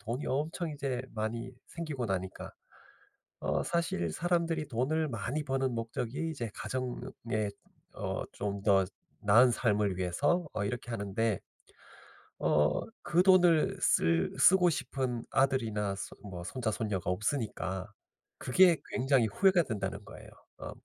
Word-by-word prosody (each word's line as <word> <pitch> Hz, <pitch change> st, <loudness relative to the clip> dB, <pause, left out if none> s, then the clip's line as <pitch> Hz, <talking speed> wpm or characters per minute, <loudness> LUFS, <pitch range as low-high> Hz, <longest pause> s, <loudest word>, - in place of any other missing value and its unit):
돈이 120 Hz, +6 st, -4 dB
엄청 155 Hz, +5 st, -1 dB
이제 135 Hz, -4 st, -3 dB
많이 115 Hz, +3 st, -3 dB, 0.2 s
생기고 150 Hz, -8 st, -4 dB
나니까 95 Hz, -1 st, -4 dB, 0.9 s
어 -, -, 0 dB
사실 165 Hz, -, -1 dB
사람들이 170 Hz, -, 0 dB
돈을 145 Hz, +6 st, 0 dB
많이 120 Hz, +6 st, -3 dB
버는 135 Hz, -2 st, 0 dB
목적이 120 Hz, +6 st, -3 dB
이제 120 Hz, -8 st, -4 dB
가정에 120 Hz, -4 st, -3 dB, 0.5 s
어 -, -, -3 dB
좀 100 Hz, -1 st, -3 dB
더 95 Hz, -3 st, +4 dB, 0.4 s
나은 115 Hz, +5 st, +6 dB
삶을 105 Hz, -5 st, +1 dB
위해서 140 Hz, -, +1 dB
어 100 Hz, -, -1 dB
이렇게 120 Hz, +3 st, -4 dB
하는데 105 Hz, 0 st, -1 dB, 1.0 s
어 75 Hz, 0 st, +2 dB, 0.2 s
그 175 Hz, +1 st, +3 dB
돈을 175 Hz, -4 st, +5 dB
쓸 80 Hz, 0 st, +3 dB
쓰고 180 Hz, -1 st, +6 dB
싶은 130 Hz, -4 st, -2 dB
아들이나 115 Hz, -7 st, +1 dB
손 -, -, -7 dB
뭐 90 Hz, -1 st, -6 dB
손자 115 Hz, +4 st, -2 dB
손녀가 100 Hz, -6 st, -2 dB
없으니까 95 Hz, -3 st, -2 dB, 0.5 s
그게 175 Hz, +6 st, +5 dB
굉장히 130 Hz, -2 st, +3 dB
후회가 185 Hz, -, +4 dB
된다는 100 Hz, -4 st, -4 dB
거에요. -, -, -12 dB, 0.3 s
어 -, -, -6 dB
120 Hz, 260 characters per minute, -31 LUFS, 100-145 Hz, 1.0 s, 나은